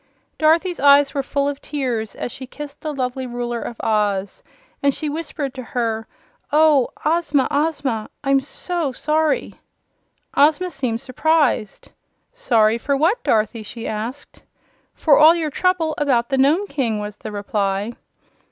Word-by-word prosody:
Dorothy's 335 +3 +2
eyes 280 0 +5
were 280 - 0
full 280 +1 -1
of 285 -1 -4
tears 245 -7 -3
as - - -5
she 260 - -8
kissed 290 +2 -9
the 310 - -3
lovely 260 -2 -3
Ruler 240 -1 -3
of 235 - -7
Oz, 205 -3 0 0.4
and 280 -1 +2
she 310 - -3
whispered 295 -3 -4
to 260 - -7
her: 225 -2 -2 0.4
"Oh, 300 -4 +4 0.2
Ozma, 310 -4 +2
Ozma! 285 -7 -1
I'm 275 -1 +3
SO 305 +1 -3
sorry!" 305 +3 0 0.8
Ozma 315 +5 +3
seemed 250 -6 -2
surprised. 275 -5 0 0.4
"Sorry 230 - +2
for 280 +4 0
what, 340 - +1
Dorothy?" 220 +1 +1
she 225 +2 -7
asked. 230 +7 -6 0.5
"For 295 -4 +4
all 315 +2 +8
your 320 -3 -2
trouble 350 -1 +1
about 250 -5 +1
the 270 - +1
Nome 305 +9 +3
King," 260 - -1
was 210 0 -6
the 215 - -7
reply. 205 0 -2
275 Hz, 145 wpm, -21 LUFS, 230-305 Hz, 0.8 s, all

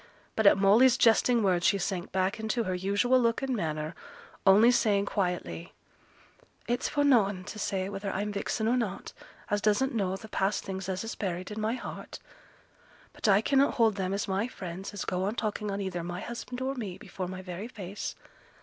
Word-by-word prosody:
But 220 -2 +4
at - - +7
Molly's 225 +6 +5
jesting 230 0 +4
words 180 -3 +2
she 200 - +4
sank 185 -2 -3
back 190 +4 0
into 220 +2 -1
her 185 - -2
usual 200 +8 +2
look 230 +2 +1
and 265 -2 0
manner, 155 -4 -2 0.5
only 210 +5 +7
saying 205 -5 +2
quietly, 180 - -3 0.9
'It's 240 +2 0
for 290 - +1
noane 205 -9 +3
to 210 +2 -8
say 190 -2 -1
whether 200 0 -4
I'm 205 +2 -2
vixen 205 +2 -2
or 245 +2 +3
not, 205 -6 -3 0.4
as 205 0 +1
doesn't 215 +6 +2
know 195 -4 0
th' 215 +2 -10
past 195 +2 0
things 190 -1 -5
as 185 +1 -2
is 225 - -4
buried 185 -1 -4
in 215 +1 -4
my 220 +2 0
heart. - - -7 1.0
But - - -3
I 200 0 +5
cannot 275 +4 +3
hold 225 -3 +4
them 190 -2 -2
as 200 +2 -1
my 195 +4 0
friends 190 -5 -7
as 205 -2 -5
go 185 +1 -1
on 210 +3 -1
talking 210 -2 -2
on 200 0 -2
either 185 -3 -3
my 175 +2 -5
husband 245 +1 -6
or 265 +1 -1
me 210 -9 -5
before 185 -2 -6
my 185 +1 -7
very 185 +4 -6
face. 200 -4 -6
200 Hz, 195 wpm, -29 LUFS, 190-225 Hz, 1.0 s, at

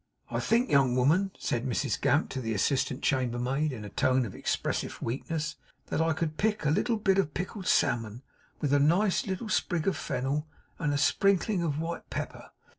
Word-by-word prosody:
'I - - 0
think, 240 +3 +1
young 135 -3 +4
woman,' 160 +10 +3
said 120 -1 -2
Mrs 130 +2 -1
Gamp 145 - +2
to 130 - -3
the 115 -2 -2
assistant 130 +5 0
chambermaid, 130 +3 0
in 110 -5 -7
a - - -7
tone 130 +5 +2
expressive 100 - -2
of - - -14
weakness, 150 +5 -3 0.3
'that - - -1
I 165 0 +2
could 155 -1 -3
pick 210 -5 0
a 150 - +3
little 230 +8 +1
bit 195 -2 +2
of 150 -7 -1
pickled 185 +1 -4
salmon, 115 +1 +1 0.4
with 145 -2 +1
a 145 - +5
nice 180 +9 +3
little 190 +4 -3
sprig 175 -4 0
of 195 - +2
fennel, 140 +3 -2 0.3
and 150 -3 0
a 145 - +1
sprinkling 195 +5 +2
of 155 -4 -1
white 165 +1 -4
pepper. - - -5
150 Hz, 190 wpm, -29 LUFS, 130-185 Hz, 0.4 s, a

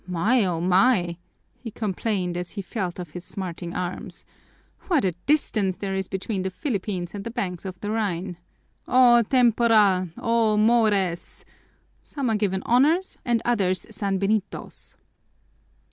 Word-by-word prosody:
"My, 205 +8 +2
oh 175 -3 -1
my!" 180 0 +3 0.4
he 235 - -9
complained 200 -4 -2
as 175 0 -5
he 200 - -5
felt 180 -1 -4
of 175 -4 -7
his 180 +2 -8
smarting 175 -2 -6
arms, 180 0 -5 0.6
"what 325 - +2
a 185 - +2 0.2
distance 215 -10 +1
there 195 0 -4
is 190 -1 -2
between 195 +1 -3
the 190 - -2
Philippines 185 - -3
and 200 -1 -6
the 230 - -5
banks 195 -7 -4
of 185 -1 -6
the 205 - -3
Rhine! 190 -5 -2 0.5
O 245 -2 +6
tempora! 225 -6 +3
O 230 -2 +2
mores! 210 -6 +1 0.6
Some 270 -5 -3
are - - +2
given 190 -3 -1
honors 305 +10 +2
and 235 -2 0
others 195 -6 +1
sanbenitos!" 200 0 -2
200 Hz, 140 wpm, -24 LUFS, 185-230 Hz, 0.6 s, O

